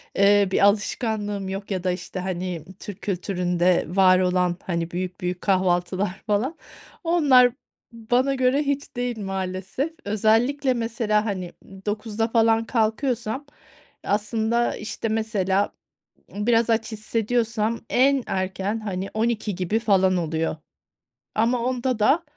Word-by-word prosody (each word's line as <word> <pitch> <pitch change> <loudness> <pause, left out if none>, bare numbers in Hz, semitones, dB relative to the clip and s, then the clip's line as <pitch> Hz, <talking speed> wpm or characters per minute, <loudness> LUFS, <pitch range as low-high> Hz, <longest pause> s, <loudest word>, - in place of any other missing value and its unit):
eee, 200 0 +5
bir - - +2
alışkanlığım 205 -1 0
yok, 195 +1 -5
ya 185 -1 -2
da, 180 - +1
işte, 180 +1 -5
hani, 180 -3 -4
Türk 205 0 -9
kültüründe 180 -2 +1
var 185 +1 +5
olan, 180 -1 +1
hani 170 -2 -2
büyük, 180 0 -4
büyük 180 0 -3
kahvaltılar 185 0 0
falan, 235 +10 0 0.5
onlar 280 -8 +5 0.4
bana 245 +4 +1
göre 260 +2 +2
hiç 280 -2 -3
değil 245 -2 -2
maalesef. 195 - -3
Özellikle 230 +6 +2
mesela, 225 -2 0
hani, 185 -4 -4 0.3
09.00´da 215 +1 -1
falan 225 -1 +3
kalkıyorsam 235 +3 -1 0.6
aslında, 220 +3 0
işte, 215 +1 -4
mesela 205 -3 0 0.6
biraz 230 +3 +1
aç 225 0 +1
hissediyorsam 225 +1 -1
en 270 0 +3
erken, 190 +3 -2
hani, 195 -2 -4
12.00 220 -3 -1
gibi 190 +5 0
falan 190 -4 +3
oluyor. 160 -1 -1 0.8
Ama 235 +3 +2
onda 255 -2 -1
da 295 +11 +3
210 Hz, 120 wpm, -24 LUFS, 185-235 Hz, 0.8 s, eee